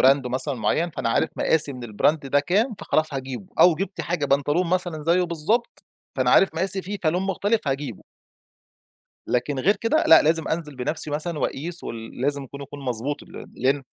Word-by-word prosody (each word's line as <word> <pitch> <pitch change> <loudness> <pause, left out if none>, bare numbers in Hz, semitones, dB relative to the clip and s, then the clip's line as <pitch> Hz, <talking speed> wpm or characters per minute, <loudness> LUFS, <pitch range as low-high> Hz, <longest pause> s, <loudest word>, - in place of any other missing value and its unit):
Brand 135 0 +5
مثلًا 130 +3 -2
معيّن 160 +8 0
فأنا 120 - -3
عارف 115 - +1
مقاسي 150 -3 +2
من 125 -2 -9
الBrand 145 +9 +3
ده 140 +1 +2
كام 210 - +1
فخلاص 155 -2 0
هاجيبه 135 +6 -5
أو 175 -2 +7
جِبت 195 +3 -4
حاجة 170 -4 -1
بنطلون 145 +6 +2
مثلًا 175 -4 -1
زيه 170 +4 +3
بالضبط، 175 - -1 0.3
فأنا - - +2
عارف 190 -4 +5
مقاسي 190 +3 -1
فيه 200 +3 -5
فلُون 175 +3 +1
مختلِف 195 -1 0
هاجيبه. 135 -6 -3 1.2
لكن 130 +3 -1
غير 195 +10 +3
كده 230 +10 +1
لأ 160 - +8
لازم 160 +1 +1
أنزل 155 -4 -3
بنفسي 150 +5 -3
مثلًا، 155 +2 -3
وأقيس 170 +5 -3
ول 115 +1 -7
لازم 140 0 0
يكون 140 +2 -10
يكون 145 +1 -9
مضبوط 130 +4 -3
ال - - -10
لأن 135 +2 +1
155 Hz, 180 wpm, -24 LUFS, 135-180 Hz, 1.2 s, لأ